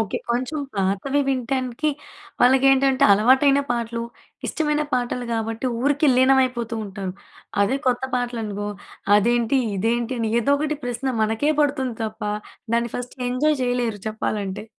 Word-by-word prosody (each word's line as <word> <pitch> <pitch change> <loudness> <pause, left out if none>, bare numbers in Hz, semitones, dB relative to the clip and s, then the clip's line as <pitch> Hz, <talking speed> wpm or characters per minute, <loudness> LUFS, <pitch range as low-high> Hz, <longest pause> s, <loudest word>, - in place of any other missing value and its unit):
Okay. 220 - -1
కొంచెం 255 +6 -1 0.2
పాతవి 200 +9 0
వినటానికి 260 +2 -1 0.5
వాళ్ళకి 260 +2 +5
ఏంటంటే 270 -1 +3
అలవాటైన 265 +7 +5
పాటలు, 235 -1 -2 0.4
ఇష్టమైన 300 -1 0
పాటలు, 245 0 -1
గాబట్టి, 225 +2 -2 0.2
ఊరికే 290 +2 +3
లీనమైపోతూ 255 -3 +3
ఉంటారు. 195 -2 -5 0.5
అదే 255 +7 +1
కొత్త 250 0 +1
పాటలు 245 -1 -2
అనుకో 205 0 -4 0.5
అదేంటి, 235 +4 +2 0.2
ఇదేంటి 235 +5 0
అని 225 -1 0
ఏదో 280 +5 +2
ఒకటి 305 +1 -1
ప్రశ్న 245 +2 -2
మనకే 225 +8 +1
పడుతుంది 265 -5 0
తప్ప, 220 +1 -6 0.5
దాన్ని 235 0 0
ఫస్ట్ 245 +1 -7
ఎంజాయ్ 295 +4 +1
చేయలేరు 245 -4 -1
చెప్పాలంటే. 210 -2 -3
245 Hz, 130 wpm, -23 LUFS, 225-270 Hz, 0.5 s, వాళ్ళకి